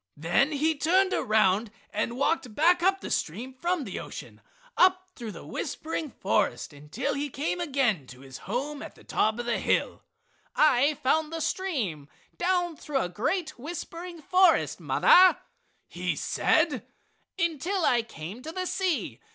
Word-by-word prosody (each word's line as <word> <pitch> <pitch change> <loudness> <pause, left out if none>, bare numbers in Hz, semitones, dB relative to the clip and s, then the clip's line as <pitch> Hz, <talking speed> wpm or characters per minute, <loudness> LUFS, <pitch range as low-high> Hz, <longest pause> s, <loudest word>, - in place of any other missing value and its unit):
Then 175 - +2
he 310 +3 +2
turned 370 +6 +2
around 215 0 +2 0.2
and 235 +3 -2
walked 260 -5 0
back 345 +3 +4
up 385 +2 +2
the - - -6
stream 230 +11 -2
from 345 +4 -1
the - - -5
ocean - - -9 0.3
up 370 0 +3
through 230 -3 -6
the - - -10
whispering 315 -1 -4
forest 165 - -1
until 150 - -4
he 285 +1 -2
came 300 +6 -2
again 260 - 0
to 125 0 -13
his 135 -1 -10
home 285 +6 -3
at - - -9
the - - -18
top 220 +1 +1
of 240 - -4
the 240 - 0
hill. - - 0 0.5
"I 295 0 +4
followed 310 +4 +2
the 330 - -3
stream 240 - -2 0.3
down 350 -2 0
through 295 -2 -3
a 175 - -2
great 265 - -2
whispering 335 +3 -7
forest, 365 0 +3
mother," 370 0 +6 0.5
he - - -3
said, - - +1 0.5
"until 340 +3 0
I 240 -1 +3
came 210 0 -9
to 310 +4 -7
the 370 +2 -3
sea. 365 -3 -1
290 Hz, 155 wpm, -27 LUFS, 230-345 Hz, 0.5 s, mother